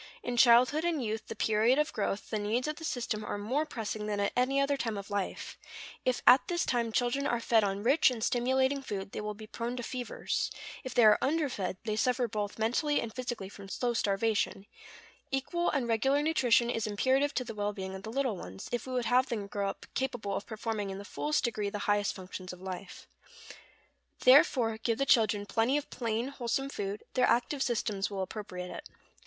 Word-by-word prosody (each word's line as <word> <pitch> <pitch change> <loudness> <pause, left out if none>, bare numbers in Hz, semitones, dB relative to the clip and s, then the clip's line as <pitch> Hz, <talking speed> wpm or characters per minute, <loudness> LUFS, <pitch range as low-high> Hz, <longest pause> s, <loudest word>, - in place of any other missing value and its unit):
In 245 - -2
childhood 250 +6 +6
and 325 -7 0
youth, 220 +1 -3
the - - -6
period 220 +4 +3
of 300 +1 +1
growth, 205 -1 -2
the 215 - 0
needs 225 +6 0
of 305 0 -3
the 325 - -9
system 235 -7 -2
are 205 - -3
more 260 +10 -1
pressing 220 -5 -4
than 205 -1 -1
at 200 - +1
any 255 +2 +2
other 275 +1 +2
time 230 -5 -2
of 200 +1 -7
life; 200 -2 -3 0.5
if 255 -1 0
at 250 +1 +7
this 345 -1 0
time 235 -2 0
children 245 +5 +1
are 240 - 0
fed 230 -1 +3
on 200 0 -1
rich 270 +6 +5
and 235 -4 -4
stimulating 260 +3 +2
food, 200 -6 -5
they - - -4
will 210 0 -4
be 215 +1 -10
prone 235 +3 -4
to 245 - -4
fevers; 250 0 -2 0.3
if 255 -2 -6
they 240 - +6
are 210 -1 +7
underfed 265 - -1
they 215 -2 -1
suffer 250 +2 +1
both 205 -1 -3
mentally 250 +7 +1
and 225 -2 -4
physically 240 -6 -4
from 195 0 -11
slow 240 +4 -1
starvation; 205 -2 0 0.6
equal 290 +6 0
and 270 -5 0
regular 270 +6 +2
nutrition 245 -6 +3
is 225 -1 -1
imperative 265 +7 +1
to 255 - +1
the 230 - -7
well 205 -1 -1
being 190 -2 -6
of 190 - -7
the 220 - -7
little 260 -3 0
ones, 95 - -8
if 240 +1 -2
we 260 - -4
would 250 -2 0
have 250 +3 +3
them 220 -5 -2
grow 200 0 -2
up - - -7
capable 245 -7 -2
of - - -4
performing 220 -2 -3
in 190 - -5
the 200 - -8
fullest 300 +7 -1
degree 215 -4 -1
the 205 - -4
highest 205 -1 +1
functions 185 0 -7
of 180 - -10
life. 185 0 -7 1.2
Therefore 255 -4 +5
give 225 0 0
the 275 - +1
children 215 -5 +3
plenty 230 +6 +2
of 295 - -5
plain, 230 +1 -2
wholesome 270 0 -2
food; 205 -4 -4
their 255 - +3
active 265 +4 +1
systems 215 -5 0
will 195 -2 -3
appropriate 180 -3 -6
it. - - -8
230 Hz, 210 wpm, -31 LUFS, 205-260 Hz, 1.2 s, at